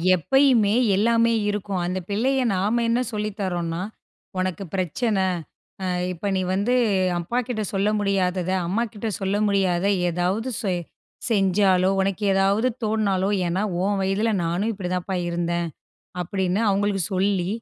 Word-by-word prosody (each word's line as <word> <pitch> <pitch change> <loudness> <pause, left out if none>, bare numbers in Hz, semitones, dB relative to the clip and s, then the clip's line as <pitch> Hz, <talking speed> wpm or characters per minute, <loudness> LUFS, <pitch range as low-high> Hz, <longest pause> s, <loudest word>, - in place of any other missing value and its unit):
எப்பயுமே 235 - +3 0.2
எல்லாமே 230 +2 +3 0.2
இருக்கும். 200 -2 -2
அந்த 185 +1 -2
பிள்ளைய 260 +6 +1
நாம 210 +6 +1
என்ன 235 +2 +2
சொல்லி 210 0 -1
தர்றோன்னா, 175 -3 -2 0.6
உனக்கு 185 0 -2
பிரச்சனை 190 +3 0 0.6
ஆ - - -1 0.3
இப்ப 180 +3 -5
நீ 185 - +1
வந்து 205 +6 +1 0.5
அப்பாக்கிட்ட 240 +4 -2
சொல்ல 195 +2 +1
முடியாதத, 185 -2 0 0.2
அம்மாக்கிட்ட 220 +2 -2
சொல்ல 195 +1 0
முடியாதத 190 -2 +1 0.2
ஏதாவது 185 +8 -1
செய் 185 -4 -1 0.5
செஞ்சாலோ, 190 -3 +3
உனக்கு 195 +2 -1
ஏதாவது 195 +5 +2 0.2
தோன்னாலோ, 200 -3 +1 0.2
ஏன்னா 180 +4 0 0.2
உன் 200 +1 +1
வயதில 195 +4 +1
நானும் 180 +7 0
இப்டி 190 -3 -5
தாப்பா 185 +1 -2
இருந்தேன். 170 0 -1 0.6
அப்டினு 190 +2 -1
அவங்களுக்கு 200 -1 +1
சொல்லி, 190 -1 +1
195 Hz, 125 wpm, -23 LUFS, 185-215 Hz, 0.6 s, எப்பயுமே